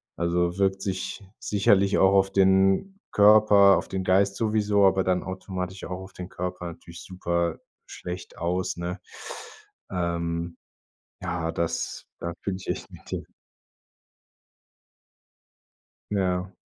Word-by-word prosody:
also, 85 +1 0
wirkt 95 0 +2
sich 95 +1 -4 0.2
sicherlich 100 -1 +3
auch 95 0 +5
auf 95 0 +3
den 95 - +3
Körper, 105 -1 +7
auf - - -7
den 95 -1 -3
Geist 95 +1 +3
sowieso, 105 -2 +2
aber 95 0 +4
dann 90 -1 +1
automatisch 95 0 -5
auch 90 0 -5
auf 95 0 -11
den 90 0 -8
Körper 90 -1 -4
natürlich 85 0 -10
super 85 -3 -1 0.3
schlecht 90 0 -8
aus, 90 +2 -1
ne? 90 +2 -4 0.9
Ähm, 85 -1 -2 0.7
ja, 85 -2 -2
dass 85 0 -3
da 85 - -3
fühle 95 - -2
ich 95 - -12
echt - - -3
mit - - -14
dir. - - -3 2.9
Ja. 95 -2 0
95 Hz, 120 wpm, -26 LUFS, 90-100 Hz, 2.9 s, Körper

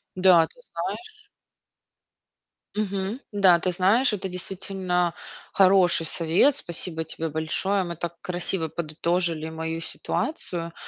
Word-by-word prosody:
Да, 180 -3 +6
ты - - -23
знаешь 430 -2 -7 1.5
мгм, 200 +2 -2
да, 190 -4 +5
ты 185 - 0
знаешь, 210 +7 +3
это 195 -1 -3
действительно 180 -1 -2 0.4
хороший 185 -4 +4
совет. 170 - +3
Спасибо 165 -1 -4
тебе 160 0 -4
большое. 170 +6 0
Мы 170 -1 -5
так 170 +1 -5
красиво 175 -1 -2
подытожили 165 0 -1
мою 160 0 -4
ситуацию, 170 - -3
180 Hz, 110 wpm, -25 LUFS, 165-195 Hz, 1.5 s, Да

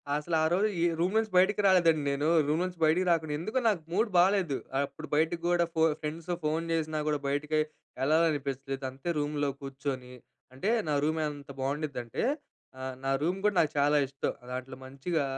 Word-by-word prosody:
అసలు 160 +3 -1
ఆ - - +3
రోజు, 205 +4 +3
ఈ - - +3 0.2
రూమ్ 180 +4 +1
నుంచి 220 -2 +1
బయటకి 205 +3 +4
రాలేదండి 165 -5 +4
నేను. 145 +2 0 0.2
రూమ్ 155 +4 +1
నుంచి 180 -1 -4
బయటికి 175 +4 +3
రాకుండా, 160 -3 +1
ఎందుకో 215 +9 -1
నాకు 195 -7 +2
మూడ్ 215 +5 +1
బాలేదు. 180 -6 +3 0.3
అప్పుడు 155 +2 -10
బయటకి 165 +2 +1
గూడా 175 -1 +3
ఫో 160 - +1 0.2
ఫ్రెండ్స్‌తో 165 +3 -3
ఫోన్ 160 +2 0
జేసినా 155 -1 0
గూడా 150 -1 +1
బయటికి 150 +2 0 0.4
ఎళ్ళాలనిపించలేదు. 140 -3 0
అంతే 135 +6 -6
రూమ్‌లో 145 -1 0
కూర్చొని 135 -2 -5 0.4
అంటే, 135 +11 -2 0.2
నా 150 - +1
రూమ్ 160 +1 +1
ఎంత 145 -1 -8
బాగుండిద్ది 140 0 -2
అంటే, 115 - -4 0.6
ఆహ్, 130 0 -4
నా 135 - 0
రూమ్ 180 +5 0
గూడా 210 -2 +2
నాకు 155 -3 +3
చాలా 145 +1 +4
ఇష్టం. 135 +1 -3 0.2
దాంట్లో 130 +1 -5
మంచిగా, 140 +4 -2
155 Hz, 175 wpm, -29 LUFS, 140-175 Hz, 0.6 s, బయటకి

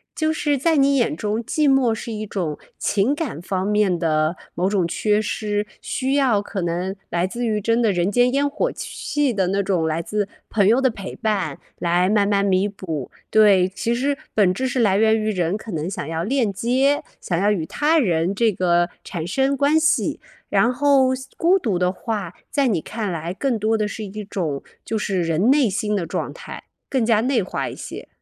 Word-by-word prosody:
就 315 -1 +1
是 295 -2 0
在 320 +4 +2
你 280 0 +4
眼 245 - +2
中 215 +4 -2
寂 300 +5 +1
寞 265 -4 +3
是 225 - -6
一 215 0 -4
种 175 -7 -3 0.2
情 205 +7 +1
感 290 - -4
方 185 +1 -2
面 210 -4 +2
的 155 0 +1 0.2
某 180 +2 0
种 195 -4 +1
缺 210 +4 +1
失， 210 -1 -2
需 265 0 -2
要 260 -7 +3
可 200 -1 -5
能 175 +3 -2
来 175 +1 0
自 240 +5 -4
于 215 -2 0
真 230 +3 +1
的 225 -3 +3
人 175 0 +1
间 245 +4 +3
烟 285 +1 +2
火 485 - -1
气 290 -4 -2
的， 190 -4 +1
那 195 +2 +1
种 185 -4 0
来 160 +1 -1
自 205 +3 -2 0.2
朋 205 -3 +2
友 235 +4 +4
的 265 -1 +3
陪 200 -4 -7
伴 195 -10 -1 0.2
来 175 +1 +2
慢 205 0 +3
慢 200 -1 +2
弥 190 0 +2
补。 165 -9 -6 0.2
对， 205 -4 +5
其 195 +5 -2
实 275 +4 0 0.2
本 195 -4 +3
质 260 +8 -2
是 255 - -1
来 205 -5 +3
源 220 +1 +4
于 215 0 0
人 180 -1 0
可 220 - -11
能 160 +2 -2
想 165 -7 -5
要 165 +1 -2
链 230 -2 0
接， 260 +8 +1 0.2
想 175 - -2
要 200 +4 +2
与 175 -6 -1
他 310 - +2
人 175 - +1
这 220 +1 +2
个 175 -1 +2
产 170 -3 -5
生 270 +7 +1
关 285 +3 +3
系。 315 0 +1 0.3
然 240 - +3
后 275 0 +3 0.3
孤 360 +3 +4
独 215 - -1
的 180 0 +1
话， 195 -2 -4 0.2
在 280 -2 +1
你 205 -8 +1
看 210 +3 -4
来 170 +1 -4
更 240 +2 -1
多 220 +1 +1
的 215 - 0
是 210 +1 -5
一 210 +2 -7
种 170 -8 -3 0.2
就 225 - -2
是 195 -4 -1
人 165 +7 +1
内 275 -4 +4
心 210 +2 -1
的 195 -5 0
状 - - -3
态， - - -9 0.3
更 260 -4 +1
加 225 -2 +3
内 240 -1 +1
化 185 - -3
一 - - -6
些。 - - -8
210 Hz, 225 characters per minute, -22 LUFS, 185-245 Hz, 0.3 s, 对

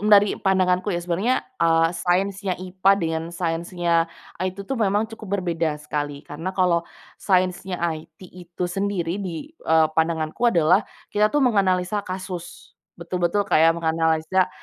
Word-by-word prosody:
dari 205 -1 +6
pandanganku 185 -1 +2
ya, 175 - 0
sebenarnya, 185 +9 0 0.2
eee, 165 0 +4
sainsnya 190 +2 0
IPA 185 +1 +1
dengan 160 -3 -2
sainsnya 170 0 0 0.3
IT 185 0 -2
tuh 270 +5 -3
memang 205 +1 +2
cukup 200 -3 -4
berbeda 165 -3 -1
sekali, 145 -1 -4
karena 160 +5 -6
kalau 180 -3 +3 0.4
sainsnya 185 -1 +1
IT 160 -1 -4
itu 175 0 -7
sendiri, 185 0 -2
di, 190 - -6
eee, 160 - +3
pandanganku 160 +3 -1
adalah 170 -2 +4 0.3
kita 210 +1 +3
tuh 295 0 +2
menganalisa 195 -3 +2
kasus, 185 -2 -7 0.2
betul-betul 175 +3 -1
kayak 165 -2 +4
menganalisa, 160 +2 +1
180 Hz, 130 wpm, -23 LUFS, 165-195 Hz, 0.4 s, dari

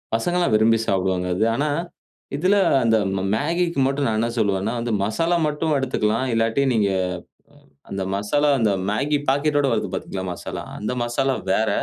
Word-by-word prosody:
பசங்கலாம் 175 +4 0
விரும்பி 115 +1 +4
சாப்பிடுவாங்க 95 -1 0
அது. 110 - +1
ஆனா 145 +4 0 0.7
இதில, 185 +7 +2 0.2
அந்த 115 -1 +3 0.2
ம 95 - -1
மேகிக்கு 170 +6 0
மட்டும் 140 +1 0
நான் 110 -1 0
என்ன 115 - +1
சொல்லுவேன்னா, 100 -1 0
வந்து 120 0 -2
மசாலா 165 +12 +1
மட்டும் 150 +1 -1
எடுத்துக்கலாம். 120 -3 0
இல்லாட்டி 115 +3 +1
நீங்க 105 -3 +2 0.2
அ - - -4 0.8
அந்த 95 -1 -3
மசாலா, 125 +9 +1
அந்த 110 -4 +2 0.2
மேகி 145 +7 0
பாக்கெட்டோட 145 +1 +2
வருது 105 -4 -1
பாத்தீங்களா 95 0 -4
மசாலா, - - -6 0.2
அந்த 105 +4 -3
மசாலா 130 +3 0 0.2
வேற. 110 0 +1
115 Hz, 155 wpm, -22 LUFS, 105-145 Hz, 0.8 s, விரும்பி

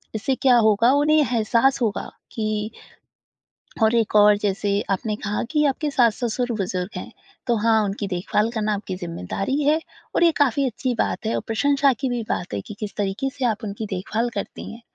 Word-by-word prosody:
इससे 220 +5 0
क्या 255 -2 +4
होगा 220 +1 +4
उन्हें 295 +2 +3
एहसास 250 -1 +2
होगा 220 -4 -1 0.2
कि 215 -1 -2 1.1
और 220 +1 +4
एक 225 -3 +1
और 210 0 +7
जैसे 200 0 0
आपने 210 +3 -1
कहा 210 0 -3
कि 300 -1 +2
आपके 290 +2 -1
सास-ससुर 245 -1 +1
बुज़ुर्ग 185 -1 -2
हैं। - - -7 0.3
तो 240 -2 +2
हाँ, 220 0 +3
उनकी 200 +1 -3
देखभाल 195 +4 0
करना 215 -2 0
आपकी 195 -2 -5
ज़िम्मेदारी 180 - -3
है 300 +3 +3 0.3
और 345 - +4
ये 335 - +6
काफ़ी 280 -1 +2
अच्छी 250 +1 -2
बात - - -1
है 225 - 0
और - - 0
प्रशंसा 275 +4 +2
की 270 - 0
भी 240 -1 -1
बात 175 - -3
है 100 - -2
कि 205 - -9
किस 210 -2 -5
तरीके 205 +7 -1
से 265 - -1
आप 220 -3 0
उनकी 210 +1 -4
देखभाल 210 +5 -1
करती 200 - -5
हैं। 230 - -11
220 Hz, 190 wpm, -23 LUFS, 205-260 Hz, 1.1 s, और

